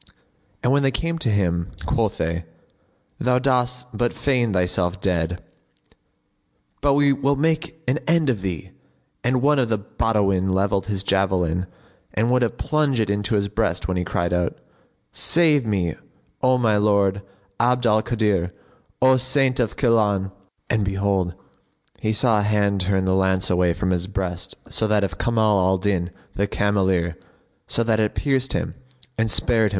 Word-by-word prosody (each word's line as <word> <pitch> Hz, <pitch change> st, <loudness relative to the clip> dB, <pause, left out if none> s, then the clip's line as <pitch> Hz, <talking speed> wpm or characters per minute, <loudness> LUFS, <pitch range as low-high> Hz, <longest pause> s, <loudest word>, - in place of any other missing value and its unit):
And 125 Hz, -, +2 dB
when 140 Hz, +1 st, +3 dB
they 135 Hz, -, +3 dB
came 165 Hz, +5 st, -2 dB
to 130 Hz, -, 0 dB
him, 85 Hz, -5 st, 0 dB, 0.2 s
quoth -, -, 0 dB
they, 85 Hz, +1 st, -2 dB, 0.7 s
"Thou 125 Hz, 0 st, +2 dB
dost 125 Hz, -1 st, 0 dB
but 120 Hz, +2 st, 0 dB
feign 125 Hz, -5 st, 0 dB
thyself 90 Hz, 0 st, 0 dB
dead, 90 Hz, -2 st, -1 dB, 1.4 s
but 140 Hz, 0 st, +3 dB
we 140 Hz, 0 st, +4 dB
will 140 Hz, +1 st, +1 dB
make 160 Hz, +2 st, -1 dB
an 130 Hz, +5 st, +1 dB
end 165 Hz, -2 st, +3 dB
of 120 Hz, -7 st, 0 dB
thee," 90 Hz, -6 st, -5 dB, 0.5 s
and 125 Hz, +1 st, +1 dB
one 145 Hz, 0 st, +4 dB
of 125 Hz, -3 st, +1 dB
the 110 Hz, -, +1 dB
Badawin 100 Hz, -2 st, 0 dB
levelled 95 Hz, +1 st, 0 dB
his 100 Hz, -3 st, -2 dB
javelin 95 Hz, -3 st, 0 dB, 0.5 s
and 115 Hz, +3 st, +1 dB
would 125 Hz, 0 st, +3 dB
have 120 Hz, -, -1 dB
plunged 150 Hz, -5 st, 0 dB
it 105 Hz, -2 st, +1 dB
into 105 Hz, +1 st, -1 dB
his 100 Hz, -1 st, +1 dB
breast 100 Hz, -4 st, -1 dB
when 95 Hz, -, -1 dB
he 90 Hz, -, -1 dB
cried 85 Hz, 0 st, -1 dB
out, 90 Hz, -1 st, -1 dB, 0.5 s
"Save 155 Hz, -7 st, +2 dB
me, 90 Hz, -6 st, 0 dB, 0.5 s
O 130 Hz, 0 st, +3 dB
my 110 Hz, -4 st, +2 dB
lord 100 Hz, -1 st, +2 dB, 0.4 s
Abd 125 Hz, +1 st, +2 dB
al 110 Hz, -1 st, +4 dB
Kadir, 105 Hz, -7 st, 0 dB, 0.5 s
O 130 Hz, 0 st, +6 dB
Saint 130 Hz, 0 st, +1 dB
of 115 Hz, -3 st, 0 dB
Gilan!" 105 Hz, -6 st, +1 dB, 0.4 s
and 110 Hz, -3 st, +1 dB
behold, 95 Hz, -2 st, 0 dB, 0.6 s
he 110 Hz, -, 0 dB
saw 110 Hz, 0 st, +3 dB
a -, -, +1 dB
hand 100 Hz, -1 st, +1 dB
turn 95 Hz, +1 st, +1 dB
the 95 Hz, -, +1 dB
lance 95 Hz, -1 st, +1 dB
away 90 Hz, -1 st, +3 dB
from 95 Hz, +2 st, -1 dB
his 90 Hz, 0 st, -1 dB
breast 95 Hz, -3 st, -4 dB, 0.2 s
to 110 Hz, -, +1 dB
that 105 Hz, -1 st, +2 dB
of 100 Hz, -, -3 dB
Kamal 110 Hz, -3 st, +2 dB
al 95 Hz, +1 st, +2 dB
Din 95 Hz, -2 st, -1 dB, 0.2 s
the 100 Hz, +1 st, 0 dB
cameleer, 95 Hz, -5 st, 0 dB, 0.5 s
so 115 Hz, -, +1 dB
that 110 Hz, -1 st, +1 dB
it 105 Hz, -1 st, 0 dB
pierced 135 Hz, -2 st, 0 dB
him -, -, -2 dB, 0.4 s
and 115 Hz, 0 st, 0 dB
spared 110 Hz, +3 st, +3 dB
himself. -, -, +2 dB
105 Hz, 165 wpm, -22 LUFS, 95-125 Hz, 1.4 s, O